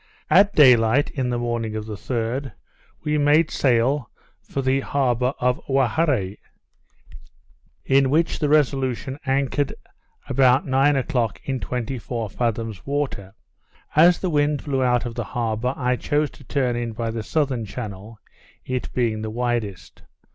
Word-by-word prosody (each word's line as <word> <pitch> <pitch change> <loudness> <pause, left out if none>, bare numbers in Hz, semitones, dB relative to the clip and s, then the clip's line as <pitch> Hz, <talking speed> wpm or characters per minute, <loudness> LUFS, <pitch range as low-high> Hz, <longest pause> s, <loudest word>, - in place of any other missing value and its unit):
At 200 +2 +5
day 130 -5 +8
light, 115 +5 +1
in 130 -3 -2
the 120 - -1
morning 120 -2 -2
of 110 -1 -4
the 110 - -6
3d, 120 +5 -3 0.5
we 150 0 0
made 150 +2 +3
sail 130 +1 +1 0.3
for 135 - -4
the 130 +1 +2
harbour 130 -2 0
of 125 0 0
Owharre; 135 - +1 1.5
in 135 0 +3
which 165 +4 +1
the 150 - 0
Resolution 135 -2 +1
anchored, 135 +1 0 0.5
about 130 0 +3
nine 135 +2 +3
o'clock, 125 -5 -1
in 135 -2 -2
twenty 125 +4 -4
four 115 -3 -4
fathoms 115 -3 -2
water. 140 -9 -3 0.6
As 170 +3 +6
the 185 - -2
wind 145 -1 +1
blew 135 -3 0
out 125 -1 +2
of 120 - -4
the 120 - -3
harbour, 120 +2 -1
I 125 -1 0
chose 150 +3 0
to - - -16
turn 130 -4 0
in 120 -1 -3
by 115 0 -3
the 115 0 -4
southern 135 -1 -1
channel, 105 0 -7 0.5
it 130 -1 -3
being 115 -3 0
the 110 - -4
widest. 115 -4 -3
125 Hz, 150 wpm, -23 LUFS, 115-140 Hz, 1.5 s, day